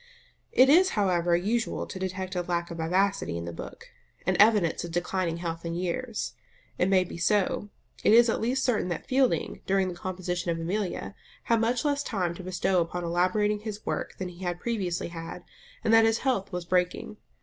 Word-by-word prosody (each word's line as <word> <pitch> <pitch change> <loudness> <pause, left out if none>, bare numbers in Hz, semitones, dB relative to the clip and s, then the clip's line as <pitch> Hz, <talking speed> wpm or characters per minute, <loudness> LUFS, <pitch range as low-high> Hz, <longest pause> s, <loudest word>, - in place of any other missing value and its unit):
It 255 - +6
is, 355 +7 +6
however, 175 -4 +2
usual 220 +6 -1
to 190 - -7
detect 185 0 -4
a 180 - +1
lack 170 -1 -2
of 170 - -6
vivacity 180 - +1
in 85 - -5
the 85 - -5
book, - - -9 0.4
an - - +2
evidence 210 -6 +4
of 170 - -5
declining 175 0 -1
health 165 -1 -4
and 170 0 -3
years. 215 +6 -3 0.5
It 180 - +3
may 190 -1 +4
be 170 - -8
so; 205 +2 +1 0.3
it - - +5
is 235 +2 +7
at 225 - 0
least 255 +4 0
certain 235 -7 +1
that 175 - -4
Fielding, 260 -1 +1
during 190 -1 +2
the - - -5
composition 180 -1 -3
of 165 0 -1
Amelia, 185 +4 -3 0.3
had 230 -1 +2
much 235 +4 +1
less 285 -1 +1
time 185 -10 -1
to 185 - -9
bestow 185 0 +1
upon 175 +1 -3
elaborating 185 +5 +1
his 215 0 -7
work - - -3
than 185 -1 -4
he 180 +1 -11
had 175 -1 -2
previously 190 -8 -2
had, 165 -1 -7 0.4
and 225 - +2
that 225 0 +7
his 225 0 +3
health 240 -8 -1
was 180 -2 -4
breaking. 180 +3 0
185 Hz, 195 wpm, -27 LUFS, 175-215 Hz, 0.5 s, is